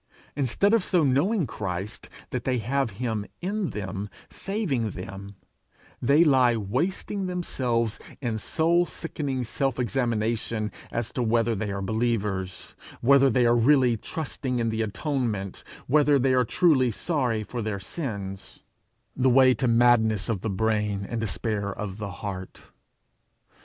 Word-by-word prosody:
Instead 145 - +2
of 230 -4 +4
so 180 -4 +2
knowing 155 - +2
Christ 100 -2 -5 0.2
that 125 -1 -2
they 130 -1 0
have 135 +2 0
him 110 -4 -2 0.2
in 195 +1 -2
them 100 0 -5 0.2
saving 170 - -1
them, 100 +1 -8 0.7
they 140 +6 +5
lie 130 -6 +4
wasting 170 - -2
themselves 125 - -1 0.2
in 120 -5 -2
soul 170 +8 +2
sickening 140 -6 -3
self 130 +2 -1
examination 115 -3 -1 0.2
as 120 -1 -3
to 125 - -2
whether 115 0 +2
they 105 -1 -3
are 100 0 -3
believers, 105 -4 -2 0.3
whether 135 +2 +6
they 125 0 +3
are 120 0 +4
really 125 0 +4
trusting 130 +1 -4
in 115 -1 0
the 110 0 -1
atonement, 110 - -2 0.2
whether 145 +1 +4
they 130 0 +2
are 125 -1 +3
truly 135 -2 +3
sorry 120 - -1
for 120 +3 -5
their 105 -2 -3
sins 100 - -6 0.5
the 130 0 +3
way 130 0 +6
to 130 0 -1
madness 115 -3 +3
of 105 -5 -1
the 110 - -2
brain, 105 0 0
and 115 -1 -3
despair 105 -1 -2
of 100 0 -6
the 100 -2 -4
heart. 95 -2 -6
120 Hz, 140 wpm, -26 LUFS, 105-135 Hz, 0.7 s, whether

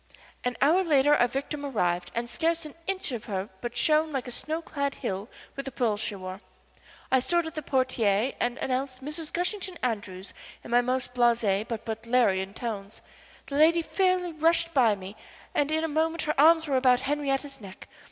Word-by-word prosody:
An 250 -1 -2
hour 340 +7 +4
later 295 -3 +4
our 245 -4 +4
victim 280 +3 -4
arrived 180 -10 0
and 235 +1 -1
scarce 325 +7 0
an 300 - -9
inch 385 -6 -2
of 235 -4 -5
her 195 -1 -3
but 240 0 -5
shone 310 0 +3
like 270 -4 -3
a - - -5
snow 310 +6 -2
clad 280 -4 -3
hill 200 -3 -4 0.3
with 275 - -5
the 270 - -5
pearls 225 -6 0
she 210 -1 -2
wore. 185 0 -7 0.7
I 260 - +5
stood 345 +6 +1
at 320 - -6
the 310 - -4
portière 255 -4 +1
and 245 +1 0
announced 260 0 -2
Mrs. 305 +1 -3
Gushington 370 +1 -2
Andrews 205 -5 -3 0.3
in - - -9
my 240 0 +5
most 250 0 -1
blasé 230 -4 +2
but 230 -1 -5
butlerian 220 -4 +1
tones. 210 -4 -6 0.4
The 280 - -4
lady 330 +2 +5
fairly 365 -1 +1
rushed 330 +1 +2
by 235 -6 +4
me, 195 +1 -9 0.4
and 290 +1 +1
in 315 +1 +1
a - - +1
moment 320 +2 0
her 300 - 0
arms 320 +2 +5
were 275 -2 +2
about 255 -1 +4
Henriette's 275 -1 -2
neck. 195 -1 -11
260 Hz, 190 wpm, -27 LUFS, 225-310 Hz, 0.7 s, I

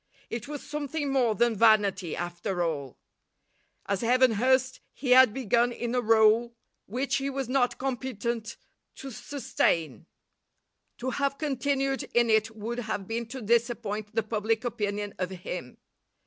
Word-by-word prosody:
It 230 +1 -4
was 290 -1 -6
something 290 -1 -3
more 240 -5 +2
than 235 0 +2
vanity 200 -5 +3
after 175 +1 -3
all. 145 -6 -3 0.9
As 200 -1 -1
Evan 250 +1 +4
Hurst 260 +4 +2 0.2
he 255 -2 -2
had 255 -2 +8
begun 240 0 +1
in 240 0 -4
a 250 - +2
rôle 225 +1 +4 0.3
which 260 +6 -1
he 275 0 -2
was 270 -2 -3
not 250 -1 +1
competent 235 -3 -3 0.4
to 270 - -8
sustain; 165 - -1 0.9
to 260 +2 -3
have 275 +1 -1
continued 275 -1 0
in 240 -1 +4
it 220 0 +3
would 230 +3 -4
have 215 -4 -4
been 230 +1 -3
to 255 +1 -7
disappoint 225 -2 0
the 225 - +2
public 220 +2 -1
opinion 205 -3 -2
of 185 -1 -1
him. 180 -7 -7
235 Hz, 145 wpm, -28 LUFS, 210-260 Hz, 0.9 s, had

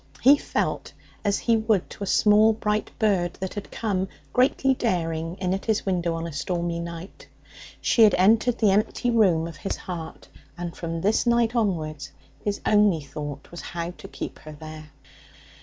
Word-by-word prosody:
He 275 +4 +8
felt - - -2 0.3
as 200 -1 +1
he 230 - +2
would 220 -4 +1
to - - -7
a - - -4
small 215 +2 +5
bright 210 -1 -1
bird 185 -5 +1
that 190 -1 -5
had 205 - -6
come, 195 -4 -1 0.3
greatly 265 +1 +3
daring, 165 - -1
in 185 -1 -1
at 195 - -3
his 220 -1 0
window 175 -3 0
on 165 0 -4
a 165 - -6
stormy 170 +2 -2
night. 170 +2 -8 0.5
She 235 - +2
had 215 -3 +7
entered 225 +6 +4
the 215 -3 +4
empty 215 +4 +1
room 185 -8 +3
of 165 -3 -9
his 195 - -3
heart, 170 -4 -7 0.3
and 175 -1 -5
from 165 -1 -4
this 215 +5 +2
night 235 0 +3
onwards 155 -10 -1 0.3
his 205 -1 -2
only 205 -6 +4
thought 145 0 -7
was 175 - -7
how 170 0 -4
to - - -12
keep - - -7
her 155 - -10
there. 155 0 -10
190 Hz, 175 wpm, -25 LUFS, 165-215 Hz, 0.5 s, He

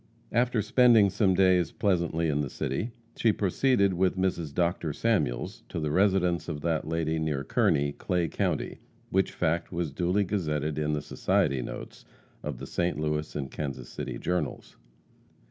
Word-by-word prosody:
After 120 -1 +2
spending 115 -2 +5
some 95 -1 +2
days 90 -2 +4
pleasantly 85 -4 0
in 75 -1 +1
the 70 - -3
city, 70 - -2 0.3
she 115 - +3
proceeded 100 +1 +2
with 95 +1 +1
Mrs. 90 -5 -1
Dr. 85 -1 0
Samuels 95 - 0
to - - -3
the 75 -2 -1
residence 90 -1 +2
of 75 -3 -4
that 80 -2 -1
lady 80 0 0
near 75 -3 -1
Kearney, 70 +1 +2
Clay 90 +3 -1
County, - - -2 0.3
which 95 0 +2
fact 85 0 -1
was 85 -4 -2
duly 90 +7 +1
gazetted 75 -6 -1
in 75 0 0
the 75 -1 -2
society 65 -1 +1
notes - - -8 0.4
of - - -4
the - - -7
St. 85 -4 -1
Louis 75 0 -2
and 70 -3 -4
Kansas 70 -3 -5
City - - -5
journals. 90 0 -3
85 Hz, 160 wpm, -28 LUFS, 75-95 Hz, 0.4 s, spending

